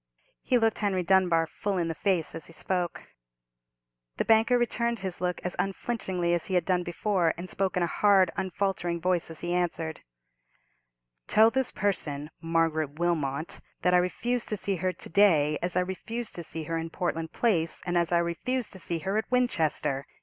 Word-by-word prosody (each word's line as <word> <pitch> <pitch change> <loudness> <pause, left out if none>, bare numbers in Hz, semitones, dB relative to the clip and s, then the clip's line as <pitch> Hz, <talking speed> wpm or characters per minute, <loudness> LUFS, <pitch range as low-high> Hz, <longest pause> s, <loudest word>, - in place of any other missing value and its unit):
He 250 - +2
looked 225 -2 +1
Henry 195 -3 0
Dunbar 175 -3 +3
full 195 +4 -3
in 170 -2 0
the 165 - -2
face 180 -1 0
as 165 - -7
he 165 - -12
spoke. 180 +1 -2 1.1
The - - 0
banker 225 +2 +4
returned 235 0 0
his 185 -2 -4
look 180 -1 -1
as 180 - -2
unflinchingly 190 -4 -1
as 175 - 0
he 190 - -1
had 175 -2 +2
done 180 -2 +2
before, 175 -1 0
and 175 +2 -6
spoke 190 0 -1
in 180 - +2
a - - +3
hard, 190 0 +4
unfaltering 190 -2 -1
voice 180 0 0
as 165 - -4
he 175 0 -2
answered: 170 -3 -2 1.3
"Tell 220 +1 +5
this 265 0 +1
person, 150 -7 -2
Margaret 165 -3 0
Wilmot, 160 -3 -1 0.2
that 180 - +3
I - - +7
refuse 235 +7 +1
to 210 - -3
see 195 -1 -2
her 185 +2 0
to - - -8
day, 160 -6 +4
as 175 0 -1
I 180 - +3
refused 215 +6 -4
to 170 - -5
see 160 0 -6
her 165 +2 -2
in 165 0 -4
Portland 165 -2 -3
Place, 170 -9 +1
and 175 - -1
as 170 -1 +2
I 175 - +4
refused 205 +8 -1
to 190 - -9
see 170 -1 -2
her 195 +3 +1
at 220 - -5
Winchester!" 160 - 0
180 Hz, 190 wpm, -28 LUFS, 165-200 Hz, 1.3 s, I